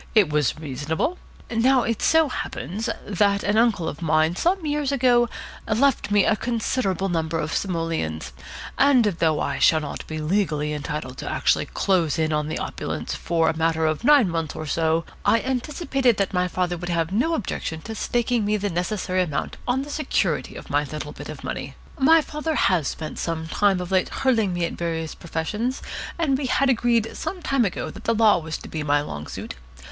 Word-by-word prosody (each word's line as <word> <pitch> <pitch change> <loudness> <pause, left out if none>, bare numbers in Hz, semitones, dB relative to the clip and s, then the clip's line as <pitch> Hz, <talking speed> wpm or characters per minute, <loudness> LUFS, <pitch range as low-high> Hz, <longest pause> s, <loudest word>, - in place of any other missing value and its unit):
It 200 -8 +5
was 150 -4 +1
reasonable. 155 - -2 0.3
Now 250 +2 +3
it 230 -1 -1
so 320 -1 +4
happens 220 -4 -4 0.2
that 200 0 +1
an 205 - +1
uncle 220 -7 +3
of 150 - -5
mine 160 +1 +2
some 355 - +1
years 295 -2 0
ago 245 -3 +3 0.4
left 235 +2 +2
me 205 -1 +4
a 220 - +3
considerable 220 -5 -1
number 165 -2 -1
of 155 -1 -2
simoleons, 165 - -2 0.5
and 275 -3 +6
though 165 -6 +1
I - - -2
shall 160 - +5
not 145 - -6
be 155 - -5
legally 155 -2 0
entitled 150 -3 -5
actually - - +1
to - - -19
close 175 -6 +1
in 160 -1 +1
on 150 0 0
the 155 - -3
opulence - - -4
for 165 -1 0
a 160 - +1
matter 160 0 +1
of 155 +6 0
nine 285 -4 +6
months 165 -3 -2
or 155 - -5
so, 160 +2 +1 0.2
I 230 - +4
anticipated 265 - 0
that 195 -1 0
my 180 0 +2
father 180 -1 -1
would 175 +1 -6
have 165 -1 0
no 260 +12 +1
objection 165 - -4
to 225 - -6
staking 240 +1 0
me 205 +1 0
to 205 -1 0
the - - -6
necessary 185 +1 -1
amount 160 -6 -2
on 255 +2 +1
the 290 - -8
security 300 -2 -1
of - - -9
my - - +2
little - - -6
bit - - -9
of - - -8
money. - - -5 0.2
My 320 +4 +6
father 305 +1 -3
has 175 - +2
spent 155 -1 -5
some 160 -1 -3
time 195 +2 +2
of 180 +1 -5
late 185 -1 +2
hurling 230 -7 +1
me 175 -1 0
at - - -4
various 165 -2 -3
professions, 210 +10 -3 0.3
and 285 -6 +1
we 275 - -2
had 270 +1 +3
agreed 235 -2 +1
some 365 -3 -5
time 270 -4 +2
ago 185 - -3
that - - -12
the 230 - +2
Law 215 -4 +5
was 160 -1 -5
to - - -11
be 155 - -4
my 145 -1 +2
long 75 - -6
suit. - - -6
190 Hz, 200 wpm, -24 LUFS, 160-240 Hz, 0.5 s, and